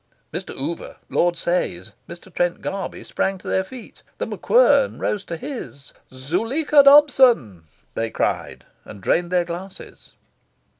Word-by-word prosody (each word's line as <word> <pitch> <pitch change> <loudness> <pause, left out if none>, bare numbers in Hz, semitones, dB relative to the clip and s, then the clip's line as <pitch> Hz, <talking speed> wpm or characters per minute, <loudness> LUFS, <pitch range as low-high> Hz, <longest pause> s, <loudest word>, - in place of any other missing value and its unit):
Mr. - - -6
Oover, 165 +5 -5
Lord 175 0 +1
Sayes, 165 - -2 0.2
Mr. 170 +1 -12
Trent 175 -1 0
Garby, 195 -1 -5
sprang 195 0 -2
to - - -13
their 190 - +1
feet; 240 +5 -12 0.2
The - - -2
MacQuern - - +3
rose 205 -2 -2
to 170 - -5
his. 160 - -8 0.2
"Zuleika 225 - +2
Dobson!" 255 - +5 0.3
they 115 0 -2
cried, - - -3 0.2
and 100 - -11
drained 170 - 0
their 180 -1 +1
glasses. 180 +3 -9
180 Hz, 135 wpm, -22 LUFS, 165-240 Hz, 0.3 s, Dobson